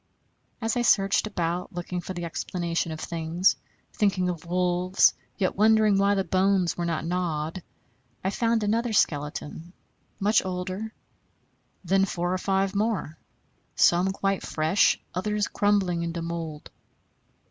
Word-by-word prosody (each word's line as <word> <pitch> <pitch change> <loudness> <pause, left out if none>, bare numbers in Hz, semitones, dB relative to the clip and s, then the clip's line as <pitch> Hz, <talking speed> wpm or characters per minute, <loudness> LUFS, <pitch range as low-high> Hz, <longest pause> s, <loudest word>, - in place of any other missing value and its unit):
As 225 -1 0
I 245 - +1
searched 200 -3 +3
about, 175 -3 -3
looking 175 0 -4
for 185 - -7
the 175 -1 -4
explanation 170 0 -2
of 155 - -6
things, 170 +3 +1 0.4
thinking 190 -3 +1
of 175 -1 -5
wolves, 180 +1 +3 0.2
yet 185 -2 0
wondering 215 -1 +4
why 200 +1 +3
the 195 - +1
bones 190 -1 +2
were 175 -1 -2
not 165 -1 -2
gnawed, 170 -1 -2 0.6
I 190 - 0
found 230 0 +1
another 225 +2 0
skeleton, 150 0 -1 0.5
much 210 +3 +3
older, 185 +3 -4 0.9
then 195 +2 +3
four 175 -1 -2
or 185 - -1
five 195 0 0
more; 200 -7 -1 0.6
some 180 +2 +4
quite 195 0 -1
fresh, 160 +5 +2
others 210 +3 -1
crumbling 200 -4 +1
into 170 0 -3
mould. 165 -3 -6
185 Hz, 135 wpm, -26 LUFS, 170-200 Hz, 0.9 s, wondering